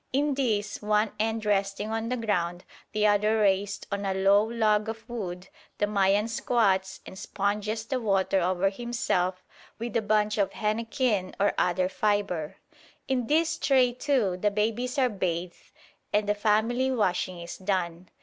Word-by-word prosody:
In 285 Hz, +2 st, +1 dB
this, 225 Hz, -7 st, -1 dB
one 210 Hz, 0 st, +1 dB
end 220 Hz, 0 st, -1 dB
resting 200 Hz, +1 st, 0 dB
on 225 Hz, +1 st, -2 dB
the 250 Hz, -, -1 dB
ground, 180 Hz, -6 st, -1 dB, 0.3 s
the 215 Hz, 0 st, +1 dB
other 210 Hz, +1 st, +3 dB
raised 200 Hz, -1 st, +1 dB
on 200 Hz, 0 st, -2 dB
a 195 Hz, -1 st, -1 dB
low 195 Hz, +2 st, +4 dB
log 220 Hz, -1 st, +1 dB
of 225 Hz, 0 st, -7 dB
wood, 185 Hz, -6 st, -5 dB, 0.3 s
the 205 Hz, -, +2 dB
Mayan 205 Hz, +1 st, +2 dB
squats 195 Hz, -5 st, 0 dB
and -, -, -10 dB
sponges 210 Hz, +3 st, -2 dB
the 255 Hz, +1 st, -2 dB
water 195 Hz, -3 st, +2 dB
over 185 Hz, +2 st, +1 dB
himself 195 Hz, -5 st, -1 dB, 0.3 s
with 230 Hz, 0 st, -5 dB
a 230 Hz, -, +3 dB
bunch 210 Hz, 0 st, +1 dB
of 200 Hz, -, +1 dB
henequen 215 Hz, -2 st, -1 dB
or 205 Hz, +1 st, +3 dB
other 180 Hz, +1 st, +1 dB
fibre. 195 Hz, -5 st, -1 dB, 0.5 s
In 250 Hz, -3 st, 0 dB
this 320 Hz, +2 st, +1 dB
tray, 255 Hz, -3 st, +3 dB
too, 245 Hz, -8 st, 0 dB
the 210 Hz, +3 st, +1 dB
babies 225 Hz, +5 st, -1 dB
are 260 Hz, -2 st, +4 dB
bathed 180 Hz, -5 st, -4 dB, 0.4 s
and 210 Hz, 0 st, +1 dB
the 205 Hz, -, +3 dB
family 220 Hz, +5 st, +1 dB
washing 185 Hz, -7 st, 0 dB
is 170 Hz, 0 st, -7 dB
done. 185 Hz, -2 st, -2 dB
210 Hz, 160 wpm, -27 LUFS, 190-225 Hz, 0.5 s, low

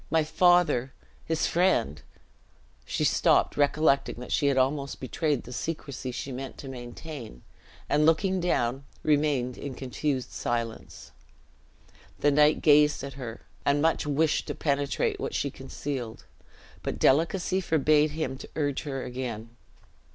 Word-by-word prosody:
My 160 Hz, -1 st, +3 dB
father, 175 Hz, -6 st, +3 dB, 0.3 s
his 160 Hz, -1 st, 0 dB
friend 170 Hz, -, +1 dB, 0.4 s
" 60 Hz, +1 st, -34 dB
she -, -, -2 dB
stopped, -, -, +3 dB
recollecting 145 Hz, -1 st, +2 dB
that 125 Hz, +1 st, -9 dB
she 145 Hz, -, +2 dB
had 140 Hz, -1 st, +2 dB
almost 140 Hz, +1 st, 0 dB
betrayed 145 Hz, +1 st, -1 dB
the 125 Hz, -, -9 dB
secrecy 135 Hz, -1 st, -4 dB
she 135 Hz, +2 st, -5 dB
meant 130 Hz, +1 st, -6 dB
to 140 Hz, -, -9 dB
maintain, 125 Hz, -, -8 dB, 0.4 s
and 150 Hz, +1 st, +2 dB
looking 185 Hz, +4 st, +3 dB
down, 135 Hz, -7 st, 0 dB, 0.2 s
remained 145 Hz, -5 st, +1 dB
in 140 Hz, -3 st, -6 dB
confused 130 Hz, 0 st, -3 dB
silence. 115 Hz, -1 st, -4 dB, 1.1 s
The 145 Hz, -, +3 dB
knight 150 Hz, +1 st, +4 dB
gazed 150 Hz, -1 st, +5 dB
at 140 Hz, 0 st, -6 dB
her, 120 Hz, -4 st, -7 dB, 0.2 s
and 140 Hz, +1 st, +2 dB
much 160 Hz, 0 st, +1 dB
wished 150 Hz, +2 st, +1 dB
to -, -, -3 dB
penetrate 140 Hz, -1 st, 0 dB
what -, -, -3 dB
she -, -, -1 dB
concealed, 125 Hz, -6 st, -6 dB, 0.6 s
but -, -, -3 dB
delicacy 175 Hz, +6 st, +2 dB
forbade 155 Hz, -2 st, +3 dB
him 150 Hz, -3 st, -4 dB
to -, -, -9 dB
urge 145 Hz, -3 st, -1 dB
her 135 Hz, -3 st, -4 dB
again. 120 Hz, -2 st, -6 dB
140 Hz, 140 wpm, -27 LUFS, 125-155 Hz, 1.1 s, gazed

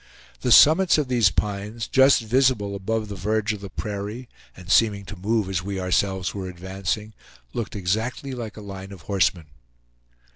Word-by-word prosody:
The 125 Hz, -, -1 dB
summits 160 Hz, +8 st, +7 dB
of 145 Hz, -4 st, -1 dB
these 120 Hz, -6 st, +4 dB
pines, 105 Hz, +4 st, -3 dB
just 135 Hz, -2 st, +5 dB
visible 120 Hz, -3 st, +2 dB
above 105 Hz, +3 st, -2 dB
the 100 Hz, -, -6 dB
verge 105 Hz, +3 st, -1 dB
of 105 Hz, -, -8 dB
the 100 Hz, -, -7 dB
prairie, 105 Hz, +5 st, -5 dB, 0.3 s
and 90 Hz, 0 st, -7 dB
seeming 105 Hz, -3 st, +3 dB
to 105 Hz, -, -8 dB
move 105 Hz, +2 st, 0 dB
as 95 Hz, -2 st, -2 dB
we 100 Hz, +1 st, -4 dB
ourselves 95 Hz, 0 st, 0 dB
were 95 Hz, -2 st, -5 dB
advancing, 95 Hz, +4 st, -4 dB, 0.4 s
looked 110 Hz, -2 st, -4 dB
exactly 110 Hz, +8 st, -2 dB
like 115 Hz, -4 st, -6 dB
a -, -, -8 dB
line 95 Hz, -1 st, -8 dB
of 95 Hz, -3 st, -11 dB
horsemen. 95 Hz, -4 st, 0 dB
105 Hz, 170 wpm, -24 LUFS, 95-115 Hz, 0.4 s, summits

